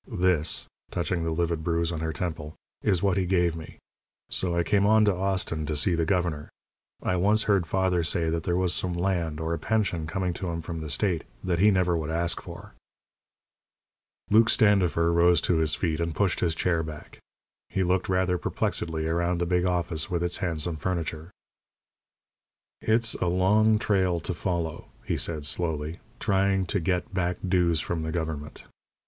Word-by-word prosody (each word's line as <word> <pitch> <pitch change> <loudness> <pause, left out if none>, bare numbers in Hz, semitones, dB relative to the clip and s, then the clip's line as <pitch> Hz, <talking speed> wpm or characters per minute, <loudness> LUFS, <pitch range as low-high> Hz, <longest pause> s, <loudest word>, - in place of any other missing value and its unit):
This," 90 -4 0 0.2
touching 85 0 -2
the 80 - -1
livid 85 0 -1
bruise 85 0 0
on 80 - -3
her 80 0 -2
temple, 80 -2 -5 0.3
"is 95 -3 +1
what 100 -2 +2
he 95 -2 +1
gave 85 -2 +2
me. 80 -1 -9 0.5
So 85 -2 +1
I 85 - +2
came 100 +4 +2
on 110 0 +5
to 105 - +3
Austin 95 -4 -1
to 75 -1 -2
see 90 +5 +3
the 85 -1 0
governor. 85 -5 -1 0.5
I 90 - 0
once 105 +4 +3
heard 100 -5 +2
father 95 -2 +1
say 85 0 0
that 85 0 -1
there 90 +2 -1
was 90 -1 +1
some 90 -1 -2
land, 85 -4 -1
or 80 +1 -2
a 85 - -2
pension, 95 -6 0
coming 90 +1 -2
to 95 - -5
him 85 -1 -4
from 85 -1 -5
the 80 - -6
state 90 +1 0 0.2
that 90 -2 0
he 105 +3 +6
never 90 -3 +2
would 80 -2 -3
ask 85 +1 0
for." - - -10 1.6
Luke 110 +1 +6
Standifer 90 -5 +3
rose 85 0 +5
to 90 - +1
his 80 -2 +1
feet, 80 -3 -1
and 85 -2 -2
pushed 100 0 +1
his 85 -2 0
chair 85 0 +1
back. 80 -2 -9 0.5
He 95 - 0
looked 90 +1 0
rather 90 -1 +1
perplexedly 80 -2 -2
around 85 +2 0
the 85 - 0
big 90 +1 +1
office, 85 -3 -1
with 85 -1 -1
its 85 0 0
handsome 85 -3 -2
furniture. 80 -1 -3 1.5
"It's 115 +1 +2
a 90 - -1
long 105 +5 +3
trail 95 -5 +1
to - - -3
follow," 85 -3 -3 0.2
he - - -1
said, 75 -3 -1
slowly, 80 +1 -2 0.2
"trying 95 -2 +1
to 100 - +2
get 90 +2 -1
back 90 -2 0
dues 85 -3 +2
from 85 -2 -3
the 80 0 -3
government. 80 -3 -4
85 Hz, 180 wpm, -27 LUFS, 80-95 Hz, 1.6 s, he